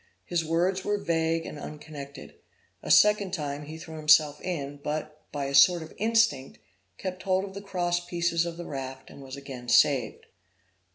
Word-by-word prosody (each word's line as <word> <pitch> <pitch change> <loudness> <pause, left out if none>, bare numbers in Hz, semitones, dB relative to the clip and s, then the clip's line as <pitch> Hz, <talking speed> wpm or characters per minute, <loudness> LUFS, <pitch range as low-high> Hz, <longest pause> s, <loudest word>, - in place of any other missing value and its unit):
His 175 -2 0
words 175 +4 0
were 205 0 0
vague 165 -3 0
and 150 - -7
unconnected. 145 -2 -9 0.5
A - - -8
second 205 -3 +5
time 145 -2 -4
he 160 +1 -7
threw 160 -1 -9
himself 150 -1 +4
in, 145 -5 -4
but, 155 0 -4
by 145 -1 -3
a 135 - -4
sort 160 +5 +6
of 160 - -12
instinct, 220 -11 +1 0.4
kept 185 0 -5
hold 190 0 +1
of 195 - -10
the 200 - -7
cross 175 -3 -1
pieces 170 -1 0
of 170 -1 -6
the 175 - -6
raft, 135 -2 -7
and - - -12
was 135 0 -8
again 130 -3 -8
saved. 130 -6 +3
160 Hz, 175 wpm, -27 LUFS, 145-180 Hz, 0.5 s, sort